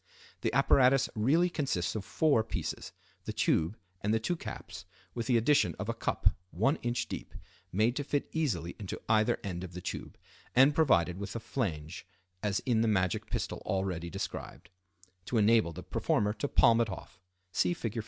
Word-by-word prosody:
The -, -, 0 dB
apparatus 135 Hz, 0 st, +4 dB
really 140 Hz, +11 st, +3 dB
consists 140 Hz, -, -1 dB
of 110 Hz, -, -3 dB
four 145 Hz, -5 st, +2 dB
pieces, -, -, -4 dB, 0.3 s
the -, -, -4 dB
tube 85 Hz, +7 st, +1 dB, 0.2 s
and 105 Hz, -, 0 dB
the 110 Hz, -, +3 dB
two 175 Hz, +10 st, -1 dB
caps, -, -, -8 dB, 0.3 s
with 115 Hz, -2 st, -3 dB
the 125 Hz, -, +4 dB
addition 115 Hz, -, +3 dB
of -, -, -4 dB
a -, -, +1 dB
cup, -, -, +1 dB, 0.2 s
1 125 Hz, -, +1 dB
in. 120 Hz, 0 st, -2 dB
deep, -, -, -7 dB, 0.4 s
made 110 Hz, +6 st, +2 dB
to 145 Hz, -, -1 dB
fit 145 Hz, 0 st, -1 dB
easily 95 Hz, -, -1 dB
into 100 Hz, -3 st, -5 dB
either 110 Hz, -1 st, +3 dB
end 90 Hz, -2 st, -4 dB
of 90 Hz, -1 st, -8 dB
the 90 Hz, -, -6 dB
tube, -, -, -6 dB, 0.4 s
and 135 Hz, +4 st, +7 dB
provided 90 Hz, -, +3 dB
with 100 Hz, -, -5 dB
a -, -, -1 dB
flange 90 Hz, -, -4 dB, 0.3 s
as 100 Hz, -2 st, 0 dB
in 115 Hz, -3 st, +1 dB
the 115 Hz, -, +2 dB
magic 95 Hz, -4 st, +1 dB
pistol -, -, -3 dB
already 95 Hz, -3 st, -2 dB
described, 85 Hz, -1 st, -6 dB, 0.5 s
to 120 Hz, -, -1 dB
enable 110 Hz, -4 st, +4 dB
the 90 Hz, +3 st, -8 dB
performer 105 Hz, 0 st, 0 dB
to 125 Hz, +6 st, -3 dB
palm 115 Hz, -3 st, +5 dB
it 115 Hz, -, 0 dB
off 90 Hz, -2 st, -9 dB, 0.3 s
(see 90 Hz, -1 st, +1 dB
Fig. 115 Hz, 0 st, -3 dB
110 Hz, 180 wpm, -31 LUFS, 90-125 Hz, 0.5 s, and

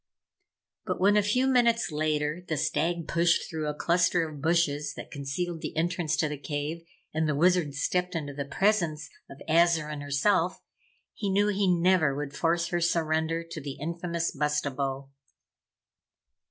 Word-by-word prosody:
But -, -, -3 dB
when, 200 Hz, +2 st, +4 dB
a 210 Hz, -, +5 dB
few 215 Hz, +6 st, +1 dB
minutes 235 Hz, -6 st, +3 dB
later, 150 Hz, +2 st, -1 dB
the 160 Hz, -, -1 dB
Stag 170 Hz, +3 st, -1 dB
pushed 170 Hz, 0 st, +2 dB
through 155 Hz, -2 st, -4 dB
a 150 Hz, -, -1 dB
cluster 170 Hz, +1 st, +2 dB
of 150 Hz, -3 st, -9 dB
bushes 150 Hz, -3 st, +1 dB
that -, -, -9 dB
concealed 155 Hz, +4 st, -4 dB
the -, -, -6 dB
entrance 170 Hz, -1 st, 0 dB
to 155 Hz, -, +1 dB
the 150 Hz, -1 st, -5 dB
cave, 150 Hz, +3 st, -4 dB, 0.3 s
and 160 Hz, 0 st, 0 dB
the 150 Hz, -, +1 dB
Wizard 170 Hz, -2 st, +2 dB
stepped 180 Hz, +5 st, -1 dB
into 145 Hz, -3 st, -3 dB
the 140 Hz, 0 st, -4 dB
presence 160 Hz, -2 st, 0 dB, 0.2 s
of 140 Hz, -, -12 dB
Azarine 160 Hz, -2 st, +2 dB
herself, 165 Hz, +6 st, +1 dB, 0.5 s
he 205 Hz, -, -3 dB
knew 205 Hz, +2 st, +2 dB
he 200 Hz, -1 st, +1 dB
never 175 Hz, -4 st, +3 dB
would 145 Hz, -1 st, -5 dB
force 170 Hz, 0 st, +1 dB
her 175 Hz, 0 st, -1 dB
surrender 165 Hz, -1 st, 0 dB
to 165 Hz, -2 st, -7 dB
the 140 Hz, -1 st, -6 dB
infamous 170 Hz, +2 st, -2 dB
Bustabo. 140 Hz, -2 st, -2 dB
165 Hz, 155 wpm, -28 LUFS, 150-175 Hz, 0.5 s, a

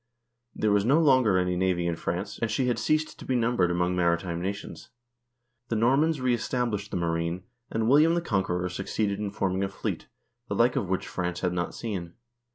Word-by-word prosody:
There 110 Hz, -, +1 dB
was 100 Hz, -1 st, +3 dB
no 135 Hz, +8 st, +4 dB
longer 130 Hz, -, +4 dB
any 90 Hz, 0 st, +1 dB
navy 90 Hz, -1 st, +1 dB
in 85 Hz, -1 st, 0 dB
France, 90 Hz, +5 st, -4 dB
and 115 Hz, -, -1 dB
she 125 Hz, +4 st, 0 dB
had 125 Hz, -1 st, 0 dB
ceased 155 Hz, 0 st, 0 dB
to -, -, -9 dB
be 130 Hz, -, -1 dB
numbered 115 Hz, -7 st, +2 dB
among 90 Hz, +1 st, 0 dB
maritime 85 Hz, 0 st, 0 dB
nations. 100 Hz, +3 st, -5 dB, 0.8 s
The 115 Hz, -, -1 dB
Normans 135 Hz, +7 st, +3 dB
reestablished 120 Hz, -4 st, -1 dB
the -, -, -3 dB
marine, 85 Hz, +1 st, -1 dB, 0.3 s
and 110 Hz, 0 st, -1 dB
William 155 Hz, +6 st, +5 dB
the 175 Hz, -, +1 dB
Conqueror 90 Hz, -, -1 dB
succeeded 100 Hz, +2 st, -2 dB
in 105 Hz, -1 st, -2 dB
forming 95 Hz, -1 st, -1 dB
a 95 Hz, -, -1 dB
fleet, 95 Hz, -, -4 dB, 0.4 s
the -, -, -2 dB
like -, -, +3 dB
of -, -, -1 dB
which -, -, -1 dB
France 90 Hz, -1 st, -3 dB
had 90 Hz, -1 st, 0 dB
not 85 Hz, -1 st, -2 dB
seen. 95 Hz, -7 st, -5 dB
100 Hz, 190 wpm, -27 LUFS, 90-120 Hz, 0.8 s, William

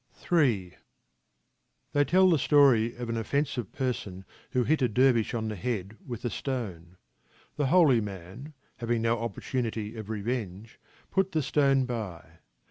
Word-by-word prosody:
Ill 120 Hz, -, +2 dB, 1.2 s
They 145 Hz, -, +3 dB
tell 185 Hz, +5 st, +5 dB
the 160 Hz, -, +3 dB
story 130 Hz, -6 st, +4 dB
of 120 Hz, 0 st, -5 dB
an 115 Hz, 0 st, -2 dB
offensive 125 Hz, +1 st, -2 dB
person 105 Hz, -8 st, -4 dB, 0.2 s
who 125 Hz, -, +1 dB
hit 155 Hz, +3 st, +1 dB
a 125 Hz, -, +3 dB
dervish 120 Hz, -1 st, +3 dB
on 110 Hz, -1 st, -2 dB
the 110 Hz, -, -3 dB
head 105 Hz, 0 st, -3 dB
with 120 Hz, -2 st, -7 dB
a 120 Hz, -, -1 dB
stone. 95 Hz, -10 st, -5 dB, 0.6 s
The 145 Hz, -1 st, 0 dB
holy 140 Hz, -7 st, +5 dB
man, 105 Hz, -, -8 dB, 0.2 s
having 115 Hz, -1 st, -1 dB
no 115 Hz, 0 st, +1 dB
opportunity 115 Hz, 0 st, -3 dB
of 110 Hz, -2 st, -8 dB
revenge, 110 Hz, -2 st, -4 dB, 0.3 s
put 190 Hz, 0 st, +1 dB
the 155 Hz, -2 st, +1 dB
stone 135 Hz, -1 st, +2 dB
by. 105 Hz, -10 st, -6 dB
120 Hz, 145 wpm, -28 LUFS, 105-135 Hz, 1.2 s, tell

